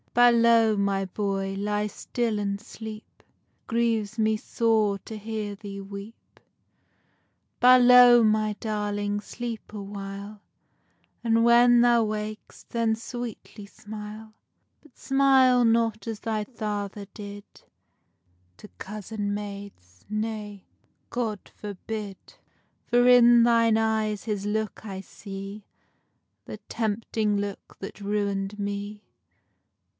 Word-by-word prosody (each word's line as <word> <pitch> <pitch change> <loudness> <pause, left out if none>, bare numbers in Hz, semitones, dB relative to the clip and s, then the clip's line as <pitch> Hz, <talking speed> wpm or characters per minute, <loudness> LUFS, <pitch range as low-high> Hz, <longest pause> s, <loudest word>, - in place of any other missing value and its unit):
Balow, 235 -2 +5
my 200 -1 0
boy, 195 0 -2
ly 210 +1 -1
still 225 +2 -2
and 200 -1 -2
sleep, 220 0 -9 0.2
It - - -39 0.4
grieves 225 -2 0
me 220 0 +2
sore 215 -2 +1
to 220 - -9
hear 210 -1 -4
thee 200 -1 -8
weep. 200 +3 -11 1.2
Balow, 250 -1 +8
my 215 -1 +2
darling, 205 -1 -2
sleep 235 0 -7
a 210 -1 -6
while, 200 +1 -8 0.8
And 230 0 +3
when 240 0 +6
thou 240 -1 +4
wak'st 215 0 -6
then 230 -1 +1
sweetly 230 -3 -8
smile; 215 +1 -9 0.5
But 305 - -23
smile 265 -2 +4
not 230 -1 +1
as 225 -2 -4
thy 220 -2 -2
father 210 -3 -5
did, 205 -1 -9 1.1
To - - -12
cozen 205 0 -4
maids, 200 - -8
nay, 215 -2 -4 0.4
God 225 -5 -3
forbid; 205 0 -6 0.7
For 245 +1 +4
in 240 -1 +7
thine 230 -1 +4
eye 220 -1 +1
his 205 -1 -4
look 215 0 -2
I 195 -3 -6
see, 195 +1 -9 0.8
The - - -7
tempting 220 -1 -1
look 200 -1 -6
that 195 +1 -8
ruin'd 200 0 -2
me. 205 +1 -4
215 Hz, 110 wpm, -26 LUFS, 205-230 Hz, 1.2 s, Balow